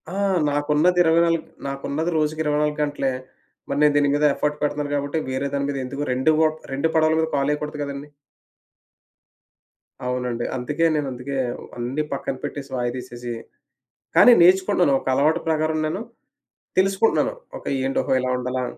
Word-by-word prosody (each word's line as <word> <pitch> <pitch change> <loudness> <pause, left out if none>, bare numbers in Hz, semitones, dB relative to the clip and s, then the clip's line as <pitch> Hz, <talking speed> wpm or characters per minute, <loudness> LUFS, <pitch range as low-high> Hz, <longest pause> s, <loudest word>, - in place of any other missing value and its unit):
ఆ! - - -3 0.3
నాకున్నది 150 +5 +2
20,000 165 0 +3 0.3
నాకున్నది 140 +4 -2
రోజుకి 155 0 0
24 150 0 0
గంటలే. 145 -2 -1 0.6
మరి - - -1
నేను 150 -1 +5
దీని 145 -1 +3
మీద 145 +1 +1
అఫర్ట్ 150 0 -2
పెడతున్నాను 145 0 -1
కాబట్టి, 145 +2 -2
వేరే 130 +2 -1
దాని 140 0 0
మీద 140 - -2
ఎందుకు 140 +3 -4
2 130 +5 +2
వట్ 155 0 +2 0.2
2 140 +4 0
పడవల 160 0 +3
మీద 160 - +1
కాలేయకూడదు 150 +1 -1
కదండీ! 140 0 -5 2.0
అవునండి. 125 -1 -2
అందుకే 150 +7 -1
నేనందుకే 135 -1 -3 0.4
అన్నీ 125 +5 -2
పక్కన 135 -1 -3
పెట్టేసి 140 -2 -6
వాయిదా 120 0 -2
వేసేసి 120 -1 -7 0.8
కానీ 245 - +9
నేర్చుకుంటన్నాను. 180 -5 +4
ఒక - - -12
అలవాటు 155 +5 +3
ప్రకారం 155 0 +1
నేను 185 +7 -3 0.8
తెలుసుకుంటున్నాను. 195 - +2 0.2
ఓకే. - - -5
ఏంటి? 135 - -1
ఓహో! - - -2
ఇలా 130 - -1
ఉండాలా? 125 0 -2
145 Hz, 145 wpm, -23 LUFS, 135-155 Hz, 2.0 s, కానీ